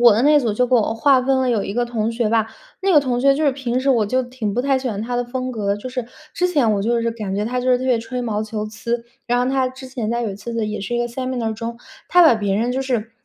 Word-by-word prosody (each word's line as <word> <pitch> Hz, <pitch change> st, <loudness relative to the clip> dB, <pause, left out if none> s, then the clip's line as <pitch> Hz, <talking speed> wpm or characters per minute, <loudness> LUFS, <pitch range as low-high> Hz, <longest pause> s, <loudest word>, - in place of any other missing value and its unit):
我 240 Hz, -2 st, +8 dB
的 230 Hz, -, +1 dB
那 295 Hz, 0 st, +5 dB
组 225 Hz, -5 st, -1 dB
就 250 Hz, +3 st, +2 dB
给 255 Hz, -, +1 dB
我 225 Hz, -1 st, +2 dB
划 265 Hz, +3 st, +4 dB
分 265 Hz, +1 st, +1 dB
了 260 Hz, -1 st, +1 dB
有 220 Hz, -4 st, +1 dB
一 200 Hz, -, -5 dB
个 245 Hz, -, +1 dB
同 230 Hz, -2 st, -2 dB
学 230 Hz, -2 st, 0 dB
吧， 225 Hz, -1 st, +2 dB, 0.3 s
那 390 Hz, 0 st, +1 dB
个 300 Hz, -, +8 dB
同 250 Hz, -3 st, -1 dB
学 275 Hz, +1 st, +5 dB
就 305 Hz, +2 st, 0 dB
是 280 Hz, -, +3 dB
平 255 Hz, -2 st, -2 dB
时 270 Hz, +1 st, +1 dB
我 225 Hz, -5 st, +3 dB
就 255 Hz, +4 st, +1 dB
挺 245 Hz, -5 st, -4 dB
不 245 Hz, -, 0 dB
太 270 Hz, -1 st, +2 dB
喜 260 Hz, -1 st, -3 dB
欢 205 Hz, -2 st, -3 dB
他 245 Hz, +2 st, -4 dB
的 245 Hz, -, +1 dB
风 255 Hz, +1 st, -4 dB
格， 205 Hz, -3 st, -1 dB
就 255 Hz, +5 st, -7 dB
是 250 Hz, -2 st, -4 dB, 0.3 s
之 360 Hz, +1 st, +1 dB
前 280 Hz, -11 st, +2 dB
我 200 Hz, -, 0 dB
就 235 Hz, +3 st, +1 dB
是 230 Hz, -, 0 dB
感 210 Hz, -4 st, -4 dB
觉 210 Hz, -, 0 dB
他 250 Hz, +2 st, -1 dB
就 250 Hz, -, -4 dB
是 250 Hz, -, +5 dB
特 255 Hz, -, -4 dB
别 255 Hz, -3 st, +2 dB
吹 245 Hz, +2 st, -4 dB
毛 215 Hz, -2 st, -1 dB
求 215 Hz, -1 st, -4 dB
疵。 235 Hz, +2 st, -4 dB, 0.2 s
然 245 Hz, 0 st, +1 dB
后 250 Hz, +2 st, +1 dB
他 265 Hz, -1 st, +2 dB
之 260 Hz, +1 st, -10 dB
前 250 Hz, -4 st, -4 dB
在 240 Hz, 0 st, -1 dB
有 220 Hz, -, -2 dB
一 -, -, -6 dB
次 210 Hz, +4 st, -7 dB
呢， 230 Hz, -1 st, 0 dB
也 215 Hz, 0 st, -4 dB
是 200 Hz, +5 st, -4 dB
一 -, -, +1 dB
个 240 Hz, -, 0 dB
seminar 245 Hz, -2 st, -3 dB
中， 230 Hz, +2 st, -5 dB, 0.3 s
他 355 Hz, -, +6 dB
把 315 Hz, -8 st, +7 dB
别 205 Hz, -3 st, -1 dB
人 235 Hz, +4 st, 0 dB
就 265 Hz, -, -1 dB
是 240 Hz, -4 st, -2 dB
240 Hz, 365 characters per minute, -20 LUFS, 220-255 Hz, 0.3 s, 我